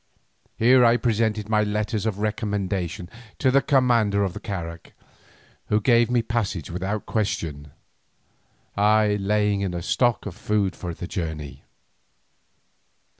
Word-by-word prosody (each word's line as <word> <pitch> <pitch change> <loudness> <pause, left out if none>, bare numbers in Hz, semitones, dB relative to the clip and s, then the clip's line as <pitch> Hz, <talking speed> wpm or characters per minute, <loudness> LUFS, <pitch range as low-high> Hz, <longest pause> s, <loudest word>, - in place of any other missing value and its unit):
Here 125 +2 +5
I 120 0 +5
presented 110 -3 0
my 105 -1 +2
letters 105 +1 -1
of 105 -3 -2
recommendation 100 -4 -2 0.3
to 130 - +2
the 140 +1 +4
commander 120 -8 +2
of 95 -3 -2
the 105 - -7
carak, 85 -5 -6 0.7
who 105 - +2
gave 115 +1 +3
me 120 -2 +2
passage 110 - -2
without 95 +4 -3
question, 80 -9 -3 1.1
I 105 0 +3
laying 105 0 +1
in 95 -3 -2
a 85 - -4
stock 120 +5 +1
of 105 - -5
food 105 -3 -1
for 85 -2 -6
the 90 - -6
journey. 80 -6 -5
105 Hz, 130 wpm, -24 LUFS, 95-115 Hz, 1.1 s, Here